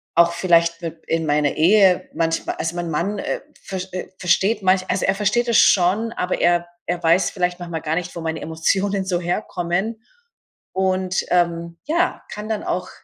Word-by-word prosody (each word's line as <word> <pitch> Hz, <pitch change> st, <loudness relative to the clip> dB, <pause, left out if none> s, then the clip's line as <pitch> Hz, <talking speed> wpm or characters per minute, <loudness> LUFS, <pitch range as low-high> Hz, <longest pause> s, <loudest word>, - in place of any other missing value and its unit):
auch 170 Hz, 0 st, +5 dB
vielleicht 170 Hz, -1 st, +2 dB
mit 165 Hz, -1 st, -7 dB
in 165 Hz, 0 st, 0 dB
meiner 145 Hz, -1 st, +2 dB
Ehe 190 Hz, +2 st, +4 dB
manchmal 165 Hz, 0 st, -1 dB
also, 165 Hz, +1 st, -3 dB
mein 175 Hz, -1 st, -3 dB
Mann, 195 Hz, +7 st, -1 dB
äh, -, -, -3 dB, 0.2 s
versch 190 Hz, -1 st, -5 dB
äh, 185 Hz, -, -4 dB
versteht 190 Hz, +4 st, +2 dB
manch 185 Hz, 0 st, +2 dB
also, 185 Hz, 0 st, 0 dB
er 195 Hz, -, +3 dB
versteht 215 Hz, +4 st, +1 dB
es 230 Hz, -, +4 dB
schon, 200 Hz, +5 st, +3 dB
aber 180 Hz, -, -2 dB
er 175 Hz, 0 st, +3 dB, 0.2 s
er 175 Hz, 0 st, -2 dB
weiß 170 Hz, +3 st, +4 dB
vielleicht 180 Hz, -1 st, -1 dB
manchmal 170 Hz, -3 st, -5 dB
gar 155 Hz, 0 st, -1 dB
nicht, 180 Hz, 0 st, -4 dB
wo 170 Hz, -, -5 dB
meine 160 Hz, 0 st, -3 dB
Emotionen 190 Hz, +5 st, 0 dB
so 180 Hz, -2 st, 0 dB
herkommen 180 Hz, +4 st, -2 dB, 0.7 s
und, 185 Hz, -1 st, 0 dB
ähm, 170 Hz, -1 st, 0 dB
ja, 340 Hz, +4 st, 0 dB
kann 210 Hz, +1 st, -6 dB
dann 215 Hz, -, -2 dB
auch 180 Hz, 0 st, -2 dB
180 Hz, 180 wpm, -21 LUFS, 170-195 Hz, 0.7 s, auch